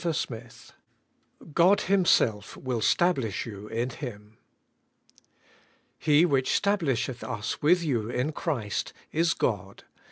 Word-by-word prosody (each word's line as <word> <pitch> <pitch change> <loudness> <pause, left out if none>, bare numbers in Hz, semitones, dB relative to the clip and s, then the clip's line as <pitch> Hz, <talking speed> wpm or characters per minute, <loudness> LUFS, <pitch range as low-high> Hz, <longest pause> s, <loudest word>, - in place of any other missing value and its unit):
ABIDE - - -2
IN 165 - +1
CHKIST 120 -5 -6 0.8
GOD 180 +5 +5
HIMSELF 170 - +2
WILL 125 -3 -3
STABLISH 135 - +1
YOU 105 -2 -8
IN 120 +4 -2
HIM. 105 -5 -8 1.6
'He 150 +2 +4
which 135 -6 +2
stablisheth 145 - 0
us 115 -4 -4
with 170 +4 +4
you 120 -8 -1
in 125 +5 -1
Christ, 135 - -3 0.2
is 165 +1 +2
God. 100 -3 -2
130 Hz, 120 wpm, -27 LUFS, 110-165 Hz, 1.6 s, GOD